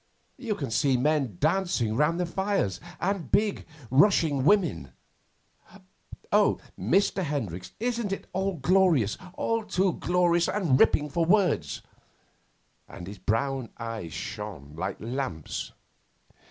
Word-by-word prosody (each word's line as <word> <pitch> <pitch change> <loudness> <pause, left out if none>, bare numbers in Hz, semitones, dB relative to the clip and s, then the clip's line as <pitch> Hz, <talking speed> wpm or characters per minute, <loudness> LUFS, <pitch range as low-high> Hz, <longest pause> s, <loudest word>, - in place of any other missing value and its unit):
You 230 -5 -2
can 140 -9 -4
see 130 +2 +2
men 135 - 0
dancing 155 - +1
round 150 +6 +2
the 180 - +1
fires, 190 - -1 0.2
and 185 -7 -2
big, 210 -1 +1 0.2
rushing 145 -3 +4
women. 150 - +2 1.4
Oh, - - +4 0.2
Mr. 190 - +1
Hendricks, 115 - -4
isn't 235 -3 -1
it 195 - -4
all 190 0 -1
glorious 165 - +3 0.2
all 230 0 -1
too 190 -3 +1
glorious 175 -1 +2
and 165 -11 +2
ripping 150 -1 +3
for 170 +3 +1
words!' 170 - +1 1.1
And 90 - -9
his 100 +1 -9
brown 125 +5 -1
eyes 115 -7 -5
shone 90 -4 -7
like 95 +4 -3
lamps. 115 - -4
150 Hz, 120 wpm, -27 LUFS, -, 1.4 s, rushing